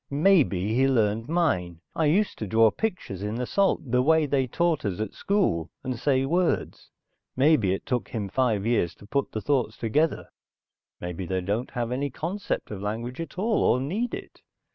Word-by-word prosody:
"Maybe 140 Hz, -, +3 dB
he 130 Hz, +3 st, +3 dB
learned 115 Hz, -2 st, +1 dB
mine. 90 Hz, -, 0 dB, 0.2 s
I 160 Hz, -, +1 dB
used 195 Hz, +8 st, +2 dB
to 110 Hz, -, -3 dB
draw 110 Hz, +2 st, +5 dB
pictures 180 Hz, -, -3 dB
in 105 Hz, +2 st, -3 dB
the 125 Hz, +1 st, -2 dB
salt, 200 Hz, +8 st, +2 dB
the 125 Hz, 0 st, +4 dB
way 160 Hz, +3 st, +4 dB
they 135 Hz, -2 st, +1 dB
taught 170 Hz, +4 st, 0 dB
us 100 Hz, -2 st, -2 dB
at 110 Hz, -2 st, -3 dB
school, 185 Hz, -, 0 dB
and 130 Hz, -1 st, -2 dB
say 130 Hz, +2 st, +1 dB
words. 175 Hz, +4 st, 0 dB, 0.5 s
Maybe 130 Hz, -8 st, +4 dB
it 95 Hz, -, -3 dB
took 125 Hz, -3 st, -2 dB
him 105 Hz, -4 st, -3 dB
five 110 Hz, -2 st, 0 dB
years 115 Hz, -8 st, +1 dB
to -, -, -15 dB
put 140 Hz, +6 st, -1 dB
the 110 Hz, -, -3 dB
thoughts 125 Hz, -5 st, 0 dB
together, 145 Hz, +9 st, 0 dB, 0.7 s
maybe 90 Hz, +1 st, -5 dB
they 95 Hz, 0 st, -1 dB
don't 105 Hz, +7 st, -2 dB
have 120 Hz, -2 st, -3 dB
any 140 Hz, +3 st, -1 dB
concept 175 Hz, -, -4 dB
of 100 Hz, -2 st, -5 dB
language 115 Hz, +7 st, -4 dB
at 165 Hz, -, -8 dB
all, 215 Hz, +3 st, +1 dB
or 125 Hz, -, +3 dB
need 205 Hz, -, -2 dB
it. -, -, -11 dB
125 Hz, 185 wpm, -26 LUFS, 105-160 Hz, 0.7 s, draw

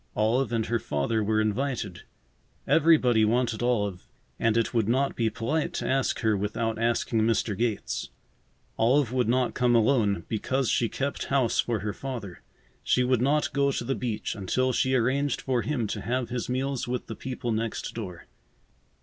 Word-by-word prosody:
Olive 115 Hz, +3 st, +1 dB
and 115 Hz, -2 st, 0 dB
her 120 Hz, 0 st, 0 dB
father 105 Hz, +8 st, -1 dB
were 110 Hz, +1 st, +1 dB
invited. 110 Hz, -3 st, -1 dB, 0.6 s
Everybody 145 Hz, -8 st, +4 dB
wanted 115 Hz, +1 st, +1 dB
Olive, 105 Hz, -7 st, -1 dB, 0.3 s
and 115 Hz, 0 st, +2 dB
it 115 Hz, -, 0 dB
would 115 Hz, -3 st, +1 dB
not 135 Hz, +3 st, +1 dB
be 115 Hz, -1 st, +1 dB
polite 135 Hz, +9 st, -2 dB
to -, -, -3 dB
ask 135 Hz, 0 st, 0 dB
her 110 Hz, -2 st, +2 dB
without 110 Hz, +3 st, -2 dB
asking 115 Hz, -1 st, +1 dB
Mr. 110 Hz, -1 st, +1 dB
Gates. 115 Hz, 0 st, -2 dB, 0.7 s
Olive 125 Hz, +2 st, +3 dB
would 125 Hz, -3 st, +1 dB
not 125 Hz, 0 st, +1 dB
come 125 Hz, -1 st, +2 dB
alone, 110 Hz, -6 st, +2 dB
because 130 Hz, +4 st, -1 dB
she 115 Hz, -, +1 dB
kept 140 Hz, +1 st, -3 dB
house 135 Hz, -4 st, +1 dB
for 115 Hz, -4 st, 0 dB
her 105 Hz, 0 st, -3 dB
father. 115 Hz, -8 st, -6 dB, 0.4 s
She 125 Hz, -, +2 dB
would 125 Hz, -1 st, +2 dB
not 145 Hz, +3 st, +1 dB
go 140 Hz, 0 st, +2 dB
to 130 Hz, -, -2 dB
the 135 Hz, +3 st, -1 dB
beach 120 Hz, -5 st, -3 dB
until 125 Hz, +6 st, 0 dB
she 130 Hz, +1 st, +2 dB
arranged 135 Hz, +4 st, +1 dB
for 125 Hz, -3 st, 0 dB
him 135 Hz, -5 st, -1 dB
to -, -, -3 dB
have 125 Hz, 0 st, -2 dB
his 125 Hz, -1 st, -3 dB
meals 130 Hz, 0 st, -1 dB
with 125 Hz, 0 st, -3 dB
the 110 Hz, -, -7 dB
people 125 Hz, +1 st, -4 dB
next 110 Hz, 0 st, -3 dB
door. 90 Hz, -7 st, -7 dB
120 Hz, 175 wpm, -27 LUFS, 110-130 Hz, 0.7 s, Everybody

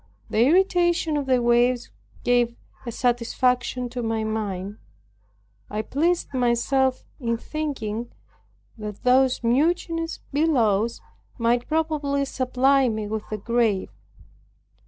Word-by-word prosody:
The -, -, +1 dB
irritation 345 Hz, 0 st, +3 dB
of 285 Hz, -2 st, -2 dB
the 255 Hz, -2 st, +2 dB
waves 240 Hz, +1 st, +2 dB, 0.3 s
gave 240 Hz, -1 st, +2 dB, 0.3 s
a -, -, -2 dB
satisfaction 250 Hz, +1 st, 0 dB
to 245 Hz, 0 st, -4 dB
my 225 Hz, -1 st, -1 dB
mind. 205 Hz, -2 st, -3 dB, 0.9 s
I 210 Hz, +1 st, -3 dB
pleased 335 Hz, +6 st, 0 dB
myself 255 Hz, +1 st, +1 dB
in 230 Hz, -3 st, -1 dB
thinking 240 Hz, -6 st, -4 dB, 0.7 s
that 210 Hz, -1 st, -7 dB
those 255 Hz, 0 st, +3 dB
mutinous 330 Hz, +6 st, 0 dB
billows 235 Hz, -8 st, +2 dB, 0.4 s
might 240 Hz, 0 st, +1 dB
probably 305 Hz, -3 st, 0 dB
supply 265 Hz, 0 st, +2 dB
me 215 Hz, -1 st, -3 dB
with 215 Hz, 0 st, -5 dB
a 215 Hz, -, -2 dB
grave. 225 Hz, -2 st, 0 dB
245 Hz, 110 wpm, -24 LUFS, 230-280 Hz, 0.9 s, irritation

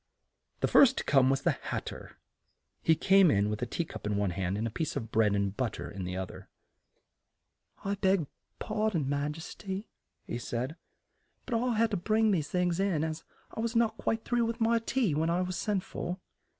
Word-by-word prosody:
The -, -, +3 dB
first 270 Hz, -1 st, +6 dB
to -, -, -1 dB
come 135 Hz, -2 st, +4 dB
was 135 Hz, 0 st, +1 dB
the -, -, +4 dB
Hat -, -, -4 dB
ter. -, -, -8 dB, 0.7 s
He 160 Hz, -, +4 dB
came 195 Hz, +1 st, +5 dB
in 105 Hz, -3 st, +2 dB
with 105 Hz, -, -3 dB
a 120 Hz, -, -1 dB
tea 165 Hz, +8 st, -2 dB
cup 105 Hz, -, -7 dB
in 105 Hz, -1 st, 0 dB
one 100 Hz, -2 st, +1 dB
hand 95 Hz, +2 st, -2 dB
and 110 Hz, -, -1 dB
a 115 Hz, -, -2 dB
piece 140 Hz, +7 st, -2 dB
of 115 Hz, 0 st, -4 dB
bread 110 Hz, -2 st, +3 dB
and 100 Hz, 0 st, 0 dB
but 120 Hz, -4 st, -1 dB
ter -, -, -6 dB
in 95 Hz, -2 st, -5 dB
the 90 Hz, +1 st, -4 dB
oth 95 Hz, -1 st, -4 dB
er. -, -, -12 dB, 1.4 s
"I 200 Hz, -, 0 dB
beg 190 Hz, -4 st, +2 dB, 0.3 s
par 215 Hz, +1 st, 0 dB
don, 165 Hz, -8 st, -1 dB
your 135 Hz, -, -2 dB
ma 145 Hz, 0 st, 0 dB
jes 160 Hz, +3 st, -7 dB
ty," 195 Hz, 0 st, -5 dB, 0.4 s
he 120 Hz, -, -4 dB
said, 120 Hz, +7 st, -3 dB, 0.7 s
"but 250 Hz, -, -4 dB
I 240 Hz, +1 st, +1 dB
had 225 Hz, +1 st, +2 dB
to 205 Hz, -, +1 dB
bring 215 Hz, +4 st, +2 dB
these 160 Hz, -3 st, -1 dB
in, 180 Hz, -2 st, +1 dB
as 160 Hz, 0 st, -3 dB, 0.3 s
I -, -, -6 dB
was 230 Hz, +1 st, -1 dB
not 230 Hz, -1 st, +2 dB
quite 225 Hz, 0 st, -1 dB
through 240 Hz, -1 st, +2 dB
with 230 Hz, +1 st, -3 dB
my 230 Hz, 0 st, +3 dB
tea 230 Hz, -, 0 dB
when 160 Hz, +3 st, +1 dB
I 175 Hz, +2 st, +1 dB
was 180 Hz, 0 st, -3 dB
sent 195 Hz, +1 st, -1 dB
for." 180 Hz, -1 st, -4 dB
170 Hz, 220 wpm, -30 LUFS, -, 1.4 s, first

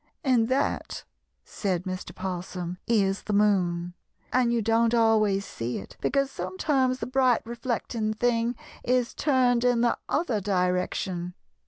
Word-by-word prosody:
"And 250 Hz, -5 st, +3 dB
that," 265 Hz, +3 st, -1 dB, 0.4 s
said 185 Hz, -4 st, -2 dB
Mr. 185 Hz, -1 st, -6 dB
'Possum, 180 Hz, -1 st, -5 dB
"is 200 Hz, -4 st, +2 dB
the 210 Hz, -, -4 dB
moon. 180 Hz, -4 st, +2 dB, 0.4 s
And 250 Hz, -2 st, +3 dB
you 235 Hz, -, +2 dB
don't 230 Hz, +1 st, +2 dB
always 215 Hz, -4 st, +3 dB
see 115 Hz, +1 st, -4 dB
it 95 Hz, -, -9 dB
because 275 Hz, 0 st, +1 dB
sometimes 270 Hz, -9 st, 0 dB
the -, -, -4 dB
bright 255 Hz, -3 st, +2 dB
reflecting 230 Hz, -2 st, -2 dB
thing 235 Hz, +1 st, +1 dB, 0.3 s
is 250 Hz, -1 st, +1 dB
turned 250 Hz, -4 st, +2 dB
in 245 Hz, -1 st, +3 dB
the 240 Hz, -1 st, +2 dB
other 260 Hz, -9 st, 0 dB
direction. 180 Hz, -1 st, -1 dB
225 Hz, 135 wpm, -27 LUFS, 185-245 Hz, 0.4 s, And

